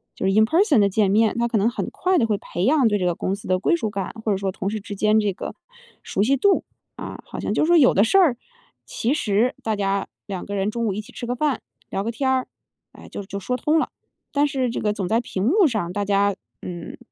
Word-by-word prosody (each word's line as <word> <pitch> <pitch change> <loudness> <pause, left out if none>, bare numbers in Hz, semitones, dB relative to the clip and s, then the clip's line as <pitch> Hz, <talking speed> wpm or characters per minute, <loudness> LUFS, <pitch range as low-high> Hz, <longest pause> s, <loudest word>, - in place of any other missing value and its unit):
就 - - -3
是 195 - +2
in 220 +1 +5
person 320 - +3
的 200 -1 +4
见 200 0 +2
面， 220 +2 +3
他 235 - +2
可 230 - 0
能 210 +4 +3
很 - - -4
快 370 0 +1
地 230 - +2
会 210 -2 +1
培 175 -1 -3
养 270 -3 +4
对 205 - +1
这 180 - 0
个 175 - +1
公 195 +3 -2
司 - - -11
的 185 0 +2
归 205 - +1
属 220 - -2
感， 200 -3 -4
或 215 - +2
者 - - 0
说 195 -1 -2
同 195 +1 -3
事 215 -1 -4
之 205 0 -7
间 215 +1 +3
这 205 -1 +1
个 185 - -7 0.5
熟 195 - -2
悉 275 +5 +3
度， 395 +8 +3 0.3
啊。 - - -7
好 - - -8
像 - - -2
就 - - +2
说 345 +1 +5
有 270 -5 +6
的 200 - +4
事 235 - +3
儿， 330 -10 +5 0.5
其 240 +5 -1
实 235 -2 +1
大 220 -2 -1
家 195 -1 0 0.2
两 190 -3 -5
个 205 - -5
人 195 +1 0
中 235 +1 -2
午 200 - 0
一 210 - -4
起 240 +5 -15
吃 245 - -6
个 245 +1 -2
饭， 290 -3 0 0.3
聊 195 - -2
个 230 - -2
天 265 +3 -1
儿， 260 -1 +1 0.5
哎， - - -13
就 - - -6
就 200 +1 -6
说 250 +6 -2
通 305 +6 +2
了。 - - -1 0.4
但 290 0 +2
是 260 -3 -1
这 - - -3
个 210 -1 +1
总 195 -4 -3
在 225 +3 +2
屏 190 -4 -4
幕 370 - +5
上， 215 -9 -2
大 205 - -1
家 200 0 +2 0.3
嗯， 175 -2 -7
215 Hz, 310 characters per minute, -23 LUFS, 200-255 Hz, 0.5 s, 有